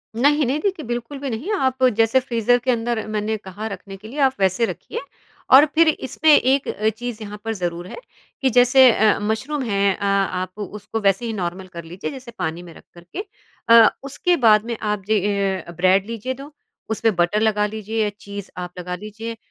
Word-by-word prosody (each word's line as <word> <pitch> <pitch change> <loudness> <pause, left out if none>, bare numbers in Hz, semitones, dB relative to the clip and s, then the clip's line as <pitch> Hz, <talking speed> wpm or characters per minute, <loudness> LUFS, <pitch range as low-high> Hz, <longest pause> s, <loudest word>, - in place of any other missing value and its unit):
नहीं-नहीं 285 +2 +2
देखिए 375 -6 -2
बिल्कुल 240 +4 -4
भी 275 -1 -4
नहीं 245 - -4
आप 260 -8 0
जैसे 225 +3 +4
फ्रीज़र 245 -1 +1
के 255 - +2
अंदर 230 -1 -1
मैंने 215 0 -2
कहा 205 +3 -7
रखने 195 -1 -8
के 215 +3 -12
लिए 280 +6 -7
आप 265 -1 +4
वैसे 190 +4 +2
रखिए 455 - -6 0.5
और 270 +3 +9
फिर 330 0 +5
इसमें 310 +1 0
एक 270 -1 +4 0.3
चीज़ 240 -2 -6
यहाँ 210 0 -8
पर 225 - -1
ज़रूर 175 -2 -4
है - - -8 0.5
कि 265 - +3
जैसे 250 +2 +6
अ, 215 -2 +3
मशरूम 240 +8 -2
हैं 200 -3 +1
अ - - -18
आप 195 -1 -1
उसको 210 +2 -5
वैसे 195 +3 +2
ही 225 - -3
नॉर्मल 185 -1 -4
कर 170 -2 -9
लीजिए 175 - -6
जैसे 260 -3 -10
पानी 160 +2 -3
में 170 -2 -12
रख - - -16
करके। 175 - -8 0.4
अ, 230 -1 +8
उसके 315 +6 0
बाद 215 0 +6
में 235 -1 -4
आप 210 -2 -2
जी 220 - +1
ए, 200 -3 0
ब्रेड 185 +2 +3
लीजिए 230 +3 -4
दो, 275 +3 -11 0.4
उसमें 220 -1 +1
बटर 175 +4 +2
लगा 210 -1 +2
लीजिए 220 +1 -3
या 210 - 0
चीज़ 200 -1 -8
आप 180 0 -5
लगा 180 0 -4
लीजिए 220 +3 -7
220 Hz, 195 wpm, -21 LUFS, 195-255 Hz, 0.5 s, और